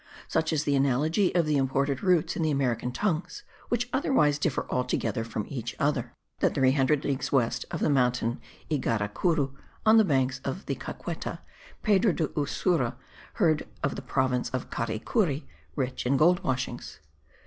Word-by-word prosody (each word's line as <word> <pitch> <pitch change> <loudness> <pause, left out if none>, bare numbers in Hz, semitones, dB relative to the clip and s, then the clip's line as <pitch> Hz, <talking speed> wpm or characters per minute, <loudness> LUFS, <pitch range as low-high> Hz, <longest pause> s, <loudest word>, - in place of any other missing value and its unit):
Such 160 +1 0
is 155 -2 +1
the 145 - +1
analogy 145 +8 +2
of 170 -2 +4
the 150 -1 +2
imported 135 +1 0
roots 180 -4 +2
in - - -2
the 160 - +2
American 125 -4 0
tongues, 195 - -2 0.3
which 240 0 0
otherwise 150 - +2
differ 150 -3 0
altogether 120 -3 -1
from 110 -2 -4
each 120 -4 -5
other, 140 -5 -1 0.2
that - - +2
300 135 +1 +3
leagues 135 -2 -1
west 125 -5 +1
of 170 - -4
the - - +2
mountain 125 -3 +1 0.3
Ygaracuru, 135 - 0 0.3
on 220 +1 +7
the 220 - +7
banks 135 -7 +1
of 160 +9 -4
the - - -1
Caqueta, - - -6 0.4
Pedro 205 -2 +4
de 160 -2 -1
Ursua 145 -2 0 0.4
heard 160 -7 +2 0.2
of 140 - 0
the - - -5
province 130 -1 0
of 130 - -4
Caricuri, 135 - -1 0.3
rich 130 -3 -2
in 135 +2 +3
gold 175 +4 +4
washings. 130 -1 -3
140 Hz, 160 wpm, -28 LUFS, 125-165 Hz, 0.4 s, on